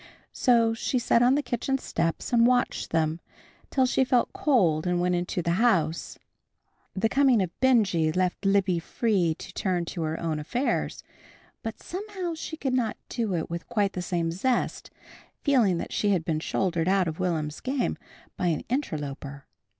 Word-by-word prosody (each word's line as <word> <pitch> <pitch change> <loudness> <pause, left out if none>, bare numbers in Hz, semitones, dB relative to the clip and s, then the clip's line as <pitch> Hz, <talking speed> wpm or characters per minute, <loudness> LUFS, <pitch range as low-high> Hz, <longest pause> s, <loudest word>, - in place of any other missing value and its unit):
So 230 -2 +3
she 225 +3 -1
sat 235 -1 +3
on 250 +2 +5
the 290 - 0
kitchen 270 +2 -1
steps 165 -2 -2
and 235 0 +6
watched 250 0 +1
them, 160 0 0 0.5
till 260 -2 +2
she 260 +1 +2
felt 250 -1 +1
cold 180 - +2
and 180 0 +1
went 180 0 +1
into 175 0 -1
the 170 - 0
house. 170 -9 +1 0.8
The 205 +3 +2
coming 265 -1 +4
of 185 -3 -1
Benjy 205 -11 +3
left 180 +3 -1
Libby 195 -3 +2
free 180 -3 0
to - - -10
turn 180 -3 -1
to 170 - -5
her 160 0 -2
own 160 -2 -2
affairs, 245 - -2 0.6
but 225 -1 -6
somehow 375 -2 -4
she 320 0 -6
could 265 -4 -2
not 240 -4 0
do 225 -6 -1
it 165 - -2
with 170 +1 -6
quite 205 -4 +1
the 180 - -3
same 170 -2 -1
zest, 240 +9 -1 0.5
feeling 240 - +3
that - - -5
she 205 - +1
had 180 -5 +1
been 155 -2 0
shouldered 170 0 -1
out 190 -1 +3
of 160 +1 -4
Will'm's 160 -4 -1
game 260 -1 -1 0.4
by 180 - 0
an 160 -3 0
interloper. 145 - -4
190 Hz, 175 wpm, -27 LUFS, 165-245 Hz, 0.8 s, and